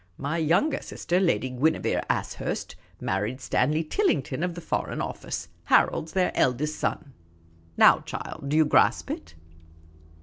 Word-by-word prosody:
My 145 +4 -2
younger 170 - +2
sister, 175 +2 -1
Lady 170 -8 +1
Guinevere 140 +6 +1
Ashurst, - - -3 0.2
married 105 +7 -2
Stanley 155 +3 +1
Tillington 155 - 0
of 180 -2 -2
the - - -6
Foreign 165 - -3
Office. - - -4 0.2
Harold 160 - +3
's - - -14
their 185 -1 +2
eldest 150 +5 0
son. 145 -4 -3 0.6
Now, - - +7
child, - - -7
do 150 - +2
you 160 - +5
grasp 150 - +3
it 80 +1 -7
155 Hz, 140 wpm, -26 LUFS, 130-170 Hz, 0.6 s, Now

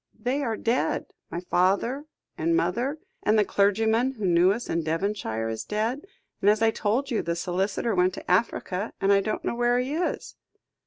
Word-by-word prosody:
They 255 +6 -1
are 230 -5 -1
dead 235 +3 -1 0.2
my 175 - -4
father 200 +11 +1 0.3
and 165 +1 +1
mother, 240 - 0 0.2
and 215 +1 +3
the 210 - +4
clergyman 220 +6 +2
who 215 -6 -4
knew 175 +1 +5
us 235 +4 -3
in 165 - 0
Devonshire 160 - -2
is 110 0 -3
dead; 225 - -2 0.3
and, 200 - +5
as 215 +2 +3
I 225 - +5
told 235 +7 -1
you, 230 - +1
the 170 0 -2
solicitor 190 +6 -1
went 180 0 +2
to - - -5
Africa; 190 0 0
and 195 +1 +3
I 195 - +4
don't 215 +2 -3
know - - 0
where 240 +1 +2
he 255 +3 -1
is." 345 +3 -3
210 Hz, 190 wpm, -26 LUFS, 180-240 Hz, 0.3 s, knew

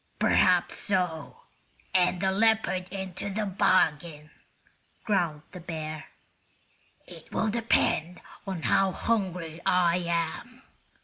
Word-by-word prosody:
"Perhaps - - +3
so, 180 -6 -2 0.5
and 180 0 +2
a 190 - +2
leopard 210 -3 +1
into 190 0 -5
the 210 +2 -2
bargain," 160 -5 +1 0.7
growled 170 -8 0
the 180 - -9
bear. 155 -2 -6 1.0
"It - - -14
will 220 - 0
depend 190 -6 +1 0.3
on 185 -4 -4
how 195 -1 +2
hungry 180 -7 -2
I 180 -1 +3
am. 170 +9 -3
180 Hz, 105 wpm, -27 LUFS, 165-195 Hz, 1.0 s, Perhaps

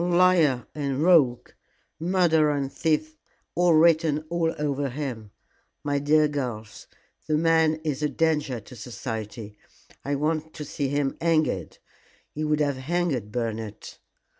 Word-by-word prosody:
Liar 175 -7 +3
and 140 -1 -2
rogue, 150 -9 +4 0.5
murderer 160 -4 +3
and 135 -1 -3
thief 155 0 -1 0.4
are 175 -2 +4
written 160 -2 +3
all 170 -1 +1
over 145 -2 -1
him. 125 -6 -5 0.5
My 145 -1 0
dear 150 +2 +3
girls, 125 -7 -5 0.4
the 155 -1 +2
man 160 -1 +3
is 150 -3 -2
a 150 - +1
danger 150 -3 0
to 110 +4 -14
society. 110 -2 -7 0.4
I 140 +1 -1
want 155 +2 -2
to 150 - -6
see 140 0 -3
him 140 0 -1
hanged. 155 - 0 0.6
He 155 - -4
would 150 0 +1
have 145 -2 0
hanged 135 - -1
Bernard." 110 -2 -4
150 Hz, 135 wpm, -25 LUFS, 130-160 Hz, 0.6 s, rogue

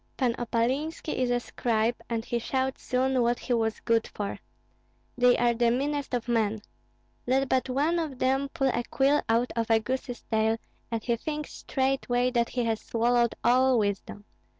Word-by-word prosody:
Pan 250 -3 +2
Opalinski 260 +8 -1
is 255 -1 0
a 245 0 +2
scribe, 230 -1 0 0.2
and 230 -1 -2
he 240 - -1
showed 260 +3 -1
soon 255 0 +1
what 240 0 +2
he 250 - -2
was 225 -1 0
good 230 -1 +1
for. 205 -1 -5 0.8
They 250 0 +4
are 240 0 +3
the 235 0 +2
meanest 280 +2 -1
of 245 0 -3
men! 220 -3 +1 0.7
Let 265 +2 +2
but 260 0 +1
one 300 +7 +1
of 305 -6 -4
them 270 +2 +1
pull 270 -1 0
a 240 - -1
quill 280 +2 +3
out 235 +2 +2
of 230 -1 -1
a 225 -1 +5
goose's 245 +2 -4
tail 220 0 +1 0.3
and 230 -2 -3
he 235 - +1
thinks 300 +4 -5
straightway 260 -2 0
that 235 -1 +1
he 245 - -1
has 225 -1 -1
swallowed 235 0 +1
all 255 +1 +4
wisdom. 205 -1 -2
245 Hz, 175 wpm, -27 LUFS, 230-265 Hz, 0.8 s, a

